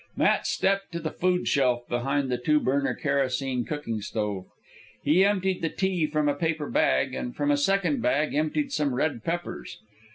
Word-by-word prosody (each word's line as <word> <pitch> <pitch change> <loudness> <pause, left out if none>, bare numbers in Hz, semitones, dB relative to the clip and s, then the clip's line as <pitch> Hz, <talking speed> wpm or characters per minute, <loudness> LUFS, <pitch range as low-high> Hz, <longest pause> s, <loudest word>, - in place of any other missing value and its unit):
Matt - - +2
stepped 195 0 0
to 170 - -2
the 155 -1 -3
food 180 0 0
shelf 125 -3 +2
behind 135 +2 -1
the 125 - 0
two 150 +5 +3
burner 140 0 0
kerosene 135 -3 0
cooking 130 -8 -4
stove. 105 -3 -3 0.6
He 160 +6 +4
emptied 190 -2 +1
the 165 - 0
tea 185 -4 0
from 150 0 0
a 145 - +3
paper 160 0 -2
bag, 65 0 +2
and 120 - -4
from 145 0 +1
a - - +4
second 180 0 +1
bag 145 +5 +1
emptied 155 - 0
some 140 - 0
red 135 -3 -1
peppers. 175 +1 -4
145 Hz, 175 wpm, -26 LUFS, 130-170 Hz, 0.6 s, He